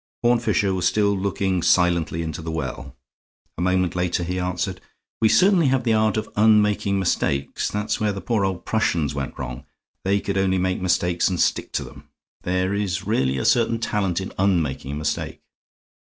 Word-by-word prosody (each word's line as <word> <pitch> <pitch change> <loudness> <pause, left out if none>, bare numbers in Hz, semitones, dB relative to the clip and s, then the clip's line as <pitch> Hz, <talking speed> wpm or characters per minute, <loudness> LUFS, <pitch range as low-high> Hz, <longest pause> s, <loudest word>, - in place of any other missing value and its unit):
Horne 120 0 +4
Fisher 105 -4 +1
was 90 -2 +1
still 100 -1 +2
looking 95 -1 -1
silently 85 -2 +2
into 80 0 -5
the 80 - -6
well; 70 -3 -5 0.6
a - - -5
moment 90 0 +1
later 90 0 0
he 90 +2 -3
answered: 90 -1 -3 0.4
"We 110 - +5
certainly 185 - +4
have 130 -1 +1
the 115 -2 +2
art 110 0 +2
of 110 - -2
unmaking 105 -2 +3
mistakes. 70 -7 -1
That's 105 +1 -2
where 105 -1 +1
the 100 - -5
poor 110 -1 0
old 95 -2 -2
Prussians 85 -9 0
went 70 -2 -5
wrong. 65 +2 -6 0.4
They 100 +1 +2
could 100 -1 -2
only 95 -1 +2
make 90 0 -1
mistakes 90 -1 +1
and 90 -2 -2
stick - - 0
to - - -1
them. - - -13 0.4
There 90 +2 -1
is 100 -1 -2
really 65 - +1
a - - -2
certain 115 -1 +3
talent 100 -6 -1
in 95 - -6
unmaking 80 -8 0
a - - -3
mistake." 75 0 -3
95 Hz, 180 wpm, -23 LUFS, 85-105 Hz, 0.6 s, We